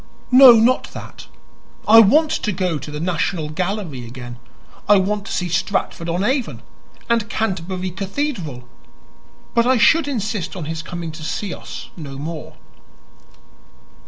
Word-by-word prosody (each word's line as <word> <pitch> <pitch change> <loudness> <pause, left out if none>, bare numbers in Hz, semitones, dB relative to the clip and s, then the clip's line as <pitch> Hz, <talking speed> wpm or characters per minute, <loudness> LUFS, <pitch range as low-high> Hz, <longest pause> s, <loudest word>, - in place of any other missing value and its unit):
"No, 255 -1 +10
not 235 +3 +3
that. - - -10 0.6
I 225 +1 +9
want 300 +9 +5
to 210 - -1
go 180 -4 -1
to - - -9
the 150 0 -6
National 165 -1 -1
Gallery 175 - -3
again; 120 0 -9 0.5
I 205 - +7
want 200 +1 -1
to - - -6
see 180 - -1
Stratford 170 0 -2
on 175 +3 -1
Avon 255 +2 -1 0.4
and 230 -2 0
Canterbury 185 -3 -3
Cathedral. 190 - -4 0.9
But 235 0 +3
I 260 0 +4
should 290 +7 +4
insist 215 -8 -3
upon 175 -5 -5
his 160 +1 -4
coming 170 0 -6
to 155 0 -10
see 195 +4 -3
us - - -9
no 140 -5 -8
more." 155 +2 -7
185 Hz, 145 wpm, -20 LUFS, 160-225 Hz, 0.9 s, No